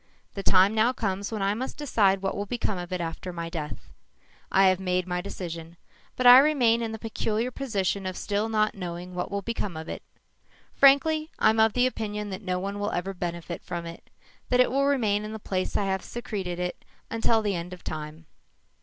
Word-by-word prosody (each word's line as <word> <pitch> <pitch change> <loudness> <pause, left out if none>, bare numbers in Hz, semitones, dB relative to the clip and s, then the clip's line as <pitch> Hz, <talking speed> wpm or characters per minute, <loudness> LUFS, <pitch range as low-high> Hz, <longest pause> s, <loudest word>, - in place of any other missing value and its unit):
The 200 - -4
time 195 +1 +5
now 225 +3 +3
comes 200 -4 -2
when 215 -3 -2
I 200 +1 +2
must 255 +5 -5
decide 200 -9 +2
what 195 - -1
will 205 0 -3
become 215 -4 -2
of 175 +1 -7
it 180 -1 -2
after 165 +2 -5
my 170 -1 -5
death. 155 -3 -6 0.6
I 195 0 +5
have 185 -1 +4
made 180 -1 0
my 180 -1 -2
decision, 170 -3 -7 0.4
but 255 - -2
I 245 +1 +11
remain 255 -6 +3
in 225 -1 -2
the 220 - -5
peculiar 225 +1 -2
position 200 -7 -1
of 185 - -4
still 205 +2 -1
not 215 -1 +2
knowing 180 -1 -6
what 180 0 -3
will 200 0 -3
become 210 -6 -3
of 160 +1 -7
it. - - -5 0.7
Frankly, 310 +3 +4
I'm 220 +1 +3
of 220 -1 +5
the 250 0 +3
opinion 210 -4 -3
that 190 +2 -5
no 185 -3 -1
one 200 +2 -4
will 205 +1 -1
ever 190 +3 -2
benefit 170 -1 -5
from 170 -1 -5
it 170 0 -10 0.4
that 250 - +3
it 250 - +5
will 275 +1 +2
remain 215 -7 +2
in 215 +1 -6
the - - -4
place 185 -3 -2
I 200 - 0
have 190 -1 -1
secreted 195 -7 -4
it 180 0 -4 0.3
until 225 0 +2
the 205 -1 0
end 175 0 -4
of 180 -1 -10
time. 155 +1 -6
200 Hz, 210 wpm, -27 LUFS, 180-225 Hz, 0.7 s, I